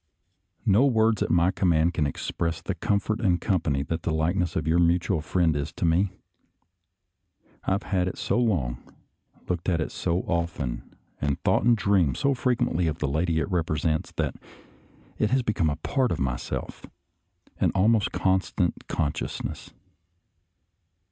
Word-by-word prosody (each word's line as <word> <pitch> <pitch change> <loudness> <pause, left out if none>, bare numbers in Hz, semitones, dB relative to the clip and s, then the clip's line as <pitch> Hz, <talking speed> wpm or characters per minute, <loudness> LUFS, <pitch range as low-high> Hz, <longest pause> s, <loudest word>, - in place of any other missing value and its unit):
No 105 +6 +5
words 110 -4 +2
at - - 0
my 85 +2 +3
command 85 -3 +2
can 75 -4 +1
express 85 +3 -3
the 100 - -3
comfort 100 +4 -1
and 90 -5 +2
company 80 -9 0
that 80 +2 -3
the - - -3
likeness 85 +2 0
of 80 - -1
our 80 +2 +3
mutual 85 -2 +2
friend 80 0 +1
is 70 -1 -2
to - - -2
me. 85 +4 +3 1.6
I - - +2
have 100 - -1
had 90 -2 0
it 90 - -4
so - - 0
long, 75 - 0 0.7
looked 90 0 -1
at 85 -2 +1
it 80 - -2
so 85 +2 -1
often, 85 -9 -3 0.3
and 70 -1 0
thought - - +3
and 120 -1 +5
dreamed 95 - +2
so 140 - +2
frequently 120 -9 0
of 80 0 -1
the 75 - -1
lady 80 +4 0
it 80 +5 -1
represents, 80 -2 0
that - - -1 0.9
it 110 - +2
has 130 0 +2
become 105 -8 +1
a 70 - -1
part 125 - 0
of - - 0
myself 60 -2 -3 0.4
— - - -36
an - - +4
almost 105 +2 +3
constant 95 -2 0
consciousness. 75 0 -3
85 Hz, 160 wpm, -26 LUFS, 80-100 Hz, 1.6 s, No